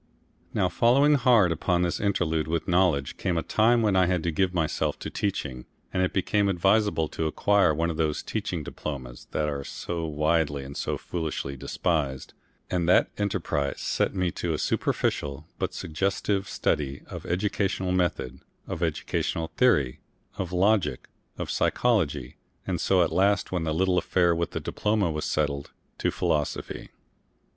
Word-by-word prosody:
Now - - +1
following 140 +6 +4
hard 120 - +5
upon 85 +2 +1
this 85 - -1
interlude 80 -6 0
with 80 0 -1
knowledge, 85 -7 +2
came 90 -2 -1
a 80 - 0
time 115 +2 +3
when 105 -3 +2
I 95 -1 +4
had 90 -3 0
to 85 - 0
give 90 +3 +1
myself 80 -4 0
to - - -6
teaching, 70 -11 -3 0.3
and 95 - +1
it 90 - +1
became 100 +1 +1
advisable 95 -2 +2
to 80 - -2
acquire 100 +2 +3
one 85 +2 0
of 80 - -6
those 80 -2 0
Teaching - - -3
Diplomas 65 -5 -7
that 75 - -1
are 70 -2 -3
so 85 +3 -4
widely 75 -1 +1
and 70 +1 -9
so - - -2
foolishly 80 -5 -4
despised, 70 0 -2 0.3
and 90 -2 0
that 90 - +4
enterprise 90 -8 -1
set - - 0
me 90 -2 0
to 85 -1 -2
a - - -2
superficial, 70 0 -1
but - - -1
suggestive 95 +4 -1
study 70 -1 -1
of - - -8
educational 95 0 0
method, 85 -8 -1 0.3
of 80 - -5
educational 80 0 -1
theory, 75 - +3 0.4
of 95 -4 -4
logic, 100 +3 +1 0.3
of - - -3
psychology, 110 -12 +1 0.3
and - - -2
so 95 -2 +4
at 85 - -1
last, 95 +4 +2
when 90 -3 -1
the 80 - 0
little 90 +2 +2
affair 90 0 +2
with 85 0 -1
the - - -4
diploma 105 -5 0
was 75 0 -3
settled, 70 -2 -1 0.3
to - - +1
philosophy. 75 -1 -2
85 Hz, 160 wpm, -27 LUFS, 75-95 Hz, 0.4 s, hard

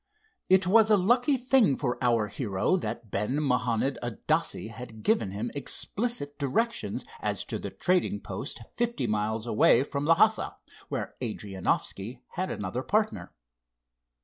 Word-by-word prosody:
It 190 0 +5
was 220 +3 +5
a 210 - +6
lucky 245 +8 +3
thing 250 - +3
for 125 -2 -2
our 115 -3 +3
hero 105 - -1
that 115 - -4
Ben 105 +8 -1
Mahanond 125 -2 0
Adasse 115 -1 -1
had 115 -1 -10
given 220 - +2
him 105 +5 -4
explicit 145 - +1
directions 225 - -1
as - - -2
to - - -3
the - - -5
trading 180 - 0
post 100 +4 -6
fifty 235 - -1
miles 110 +1 -1
away 115 +2 +4
from 140 +1 -3
Lhassa, 205 +7 +3 0.3
where - - -4
Adrianoffski 105 +1 -3
had 185 +1 -3
another 105 +5 -3
partner. 130 - -1
130 Hz, 135 wpm, -28 LUFS, -, 0.3 s, a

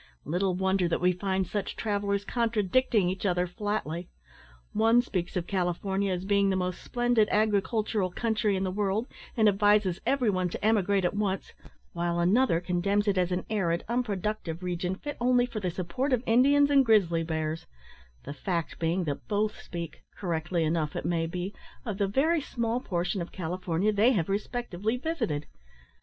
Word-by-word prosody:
Little 180 +4 0
wonder 190 -1 +1
that 170 - 0
we 180 +1 +3
find 190 +1 -1
such 205 +1 -3
travellers 200 -2 -1
contradicting 230 -2 +1
each 185 +1 -3
other 180 -2 +1
flatly. 180 -3 -3 0.6
One 225 +3 +4
speaks 180 -6 -3
of 175 - -2
`California' 190 +2 -1
as 180 0 -2
being 200 0 +3
the 190 - +1
most 180 -1 -2
splendid 240 -3 +2
agricultural 210 -1 +1
country 220 +1 0
in 190 - -1
the 185 - -1
world, 205 +3 0 0.3
and 220 -2 +5
advises 205 -2 +3
every 255 -3 +2
one 185 -2 0
to 185 - -5
emigrate 200 -3 +3
at - - +1
once; 200 -2 -2 0.4
while 170 0 -1
another 185 +1 +3
condemns 185 +4 0
it 200 - +3
as 180 -1 +1
an 180 0 -1
arid, 175 -6 0
unproductive 210 -7 -2
region, 180 +1 -2
fit 290 +8 -6
only 245 0 +4
for 235 -3 -5
the 185 -3 -1
support 195 - -2
of 245 -1 +1
Indians 280 +5 +4
and 275 -1 +6
grizzly 195 -8 +3
bears; 160 -1 -3 0.6
the - - -6
fact 170 +3 -3
being, 170 +3 0
that 145 -4 -4
both 210 0 -1
speak, 170 -2 -7 0.2
(correctly 170 -2 -1
enough, 155 -1 0
it - - -3
may 165 -1 0
be), 180 +4 -4 0.3
of 210 -4 -4
the 200 - +2
very 305 - +2
small 235 -3 -2
portion 180 -3 -2
of 170 - -6
California 180 +3 -1
they 220 +6 +4
have 175 -6 0
respectively 215 +1 -2
visited. 240 - -2
195 Hz, 170 wpm, -28 LUFS, 175-220 Hz, 0.6 s, and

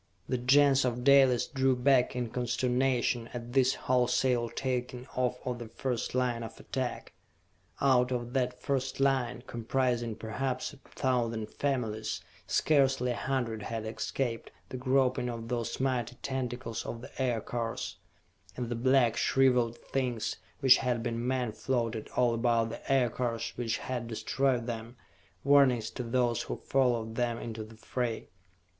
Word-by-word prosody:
The 125 - -1
Gens 140 +2 +5
of 125 -1 -1
Dalis 135 -3 +6
drew 135 -3 +1
back 125 0 +3
in 120 -2 -2
consternation 125 -1 0
at 120 0 -6
this 130 -1 +4
wholesale 125 -1 +1
taking 125 -1 -3
off 125 -1 0
of 125 -1 -2
the 120 - -6
first 120 +1 -3
line 125 -2 +1
of 115 - -8
attack. 130 -2 -4 0.7
Out 130 -2 +3
of 120 -1 -3
that 125 -2 0
first 135 -1 -2
line, 130 -3 +1
comprising 120 -1 -1
perhaps 125 +7 -3
a - - -13
thousand 115 -5 -2
families, 110 -8 -2 0.3
scarcely 135 -4 +3
a - - -2
hundred 120 -5 -2
had 110 +1 -4
escaped 115 +2 -3 0.2
the 130 - -5
groping 130 -1 +2
of 115 -1 -6
those 120 -2 -2
mighty 125 -3 0
tentacles 125 -3 -3
of 115 - -6
the 130 - -8
Aircars 120 -2 -2 0.6
and 125 -2 -3
the 120 - -1
black, 125 -1 +3
shriveled 125 -3 +3
things 125 -4 -2 0.2
which 130 -2 +8
had 120 -2 -1
been 120 0 -2
men 125 -3 0
floated 115 -2 -2
all 125 -1 +3
about 115 -1 +2
the 115 - -6
Aircars 120 -3 0
which 115 -2 -1
had 120 -2 -4
destroyed 120 +3 0
them, 115 0 -6 0.5
warnings 130 -5 +4
to - - -5
those 120 0 +1
who - - -4
followed 120 -4 +1
them 120 0 0
into 110 -2 -5
the 110 +1 -13
fray. 120 0 -3
125 Hz, 145 wpm, -30 LUFS, 115-130 Hz, 0.7 s, which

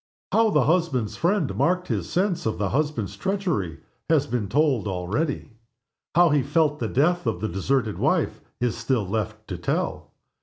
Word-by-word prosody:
How 225 0 +4
the 150 -9 +3
husband's 140 - +1
friend 175 - +1
marked 180 +1 +1
his - - -2
sense 180 -2 0
of 110 - -1
the 100 0 0
husband's 145 -5 -1
treachery 175 - -2 0.3
has 155 -3 +4
been 120 -8 -2
told 140 -7 +2
already. 100 - -2 0.6
How 175 0 +6
he 145 -2 +3
felt 150 +2 +1
the 115 - -1
death 165 +5 +1
of 110 -6 0
the 110 - -1
deserted 110 +4 -1
wife - - +1 0.2
is 120 -2 0
still 115 -3 0
left 110 +1 -3
to 90 -3 -4
tell. 85 - -2
135 Hz, 165 wpm, -25 LUFS, 110-165 Hz, 0.6 s, How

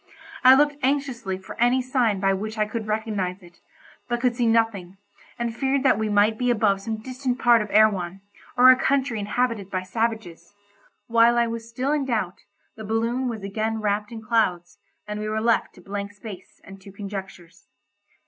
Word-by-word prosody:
I 255 +1 +9
looked 290 +1 +2
anxiously 260 -8 -1
for 190 - -10
any 245 +2 +4
sign 250 -5 0
by 195 0 +2
which 215 +3 -4
I 215 - +2
could 220 0 -5
recognise 205 -4 -2
it, 175 0 -18 0.5
but 240 0 -1
could 245 -1 +1
see 240 -1 +1
nothing, 220 -5 0 0.4
and 235 -1 -3
feared 270 +1 0
that 255 -6 +3
we 220 -1 -1
might 210 +1 +2
be 250 0 +1
above 210 -4 +2
some 220 +2 -4
distant 255 0 -3
part 240 -3 +4
of 210 - -5
Erewhon, 195 -4 +2 0.4
or 255 +1 +9
a - - +6
country 265 -3 0
inhabited 210 -1 -1
by 185 -1 -3
savages. 220 -2 -4 0.5
While 235 +1 +4
I 235 - +3
was 230 0 -6
still 255 +4 -2
in 295 -2 0
doubt, 215 -8 -2 0.4
the 220 - -9
balloon 230 +4 -1
was 220 -4 -6
again 220 +3 -2
wrapped 210 +1 -1
in 225 -1 -8
clouds, 185 -7 0 0.3
and 210 0 -4
we 215 0 -3
were 215 0 -1
left 230 +1 +1
to 180 - -15
blank 200 +2 -6
space 205 -3 -11
and 195 0 -13
to 195 - -12
conjectures. 190 -3 -9
220 Hz, 185 wpm, -24 LUFS, 200-240 Hz, 0.5 s, I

